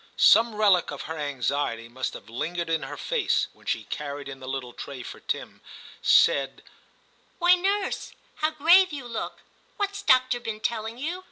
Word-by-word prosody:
Some 230 -1 +6
relic 200 -5 +4
of 145 - -6
her 160 - -5
anxiety 140 -4 -2
must 130 +3 -4
have 100 - -11
lingered 165 +9 -3
in 160 - +1
her - - -7
face - - 0
when - - -22
she - - -1
carried 145 -1 -6
in 135 -1 -8
the 130 - -10
little 130 -2 -4
tray, 135 -3 -8
for - - -9
Tim - - -5 0.4
said, 135 -1 +3 0.7
'Why, 350 0 +5
nurse, 390 +2 -1 0.3
how 310 - +1
grave 335 +5 +5
you 280 -4 -6
look; 230 -2 -5 0.4
what's 405 -1 -2
doctor 255 -1 +4
been 225 -2 -5
telling 225 +1 -3
you?' 325 +8 -3
215 Hz, 170 wpm, -26 LUFS, -, 0.7 s, Some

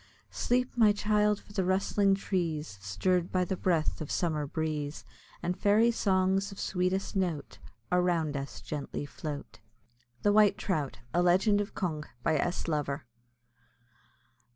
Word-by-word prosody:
Sleep, 250 +1 0
my 220 -3 +5
child! 210 0 +2
for 205 - -17
the 195 -3 +1
rustling 195 +1 +2
trees, 165 - -2
Stirr'd 170 - 0
by 185 -1 +2
the 190 - -2
breath 170 -5 0
of 155 - -5
summer 155 -5 0
breeze, 150 -1 -3 0.4
And 180 +1 0
fairy 210 +5 +4
songs 195 -2 +1
of 195 - -10
sweetest 185 +2 -1
note, 175 -6 -2 0.3
Around 175 -4 +2
us 140 0 -5
gently 145 -1 -4
float. 145 0 -7 0.6
THE 205 - +4
WHITE 210 -1 +5
TROUT; 150 -8 -2 0.2
A 175 - +3
LEGEND 190 +4 +4
OF 205 - -6
CONG. 155 -5 -2 0.2
BY 155 - +2
S. 175 +5 -1
LOVER. 150 -2 -2
180 Hz, 140 wpm, -30 LUFS, 155-200 Hz, 0.6 s, my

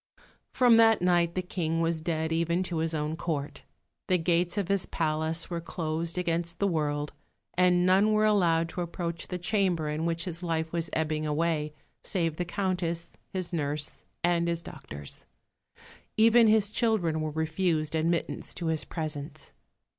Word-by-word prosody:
From 245 -3 +5
that 225 -4 +5
night 175 -1 +3
the 185 - -1
King 165 -2 -2
was 165 -1 0
dead, 160 -1 -1
even 170 +2 +1
to 175 -2 -3
his 160 0 0
own 150 +1 -1
Court. 155 -4 -4 0.4
The 185 - +3
gates 175 +2 +1
of 200 -4 0
his 200 -1 +1
palace 160 +1 -1
were 170 -1 -2
closed 165 0 -3
against 170 -1 -1
the 200 - +1
world, 150 -4 -1 0.4
and 180 0 +4
none 195 +4 +4
were 215 0 +3
allowed 170 -6 +3
to 180 - -4
approach 170 -1 -4
the 180 - -3
chamber 180 -4 +1
in 155 +2 -1
which 170 0 -1
his 170 -2 -5
life 160 -2 -1
was 170 -1 -2
ebbing 155 -1 -1
away, 150 0 0 0.3
save 165 -5 0
the 180 - -1
Countess, 175 -2 -2 0.2
his 185 -1 -4
nurse, 150 -1 -2 0.2
and 170 -1 +2
his 170 0 -1
doctors. 70 0 -9 0.9
Even 230 +1 +6
his 215 -1 +3
children 210 -9 +1
were 155 - -1
refused 160 0 0
admittance 165 +1 -1
to 175 - -4
his 160 -1 +1
presence. 155 -2 -5
170 Hz, 160 wpm, -28 LUFS, 160-180 Hz, 0.9 s, Even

